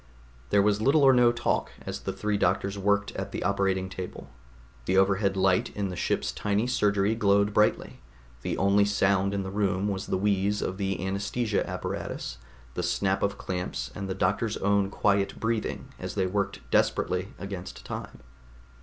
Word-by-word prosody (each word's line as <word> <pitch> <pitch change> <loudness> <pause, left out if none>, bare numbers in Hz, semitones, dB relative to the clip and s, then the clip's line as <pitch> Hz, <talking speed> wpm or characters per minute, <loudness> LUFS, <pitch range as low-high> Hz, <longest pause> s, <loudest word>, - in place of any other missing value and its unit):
There 100 - +4
was 105 0 +2
little 140 +5 +4
or 135 -1 +7
no 120 -1 +5
talk 120 0 0 0.2
as - - -4
the - - -3
three 105 0 -2
doctors 95 +1 +1
worked 100 +1 +1
at - - -5
the - - -3
operating 95 -1 +1
table. 95 -1 -8 0.5
The 95 - +2
overhead 95 0 +3
light 95 -1 +3
in 100 -2 -1
the 90 - -5
ship's - - -1
tiny 105 +2 0
surgery 105 -4 +2
glowed 100 -1 +2
brightly; 105 0 +1 0.4
the - - -2
only 100 +1 +4
sound 100 -1 +2
in 100 -1 -1
the 95 - -5
room 100 -1 0
was 95 0 -3
the - - 0
wheeze 100 +1 +1
of 95 - -3
the 95 -1 -2
anaesthesia 100 +3 -1
apparatus, - - -4 0.3
the 90 - -2
snap 95 +2 0
of 100 0 0
clamps 90 -1 -4
and 100 -2 -5
the 95 - -2
doctors' 110 +3 0
own 100 0 +2
quiet 100 -1 +1
breathing 115 -1 -2
as - - -5
they 95 -2 +1
worked 100 +2 -2
desperately 90 +2 +1
against 95 -2 -7
time. - - -7
100 Hz, 170 wpm, -27 LUFS, 95-105 Hz, 0.5 s, or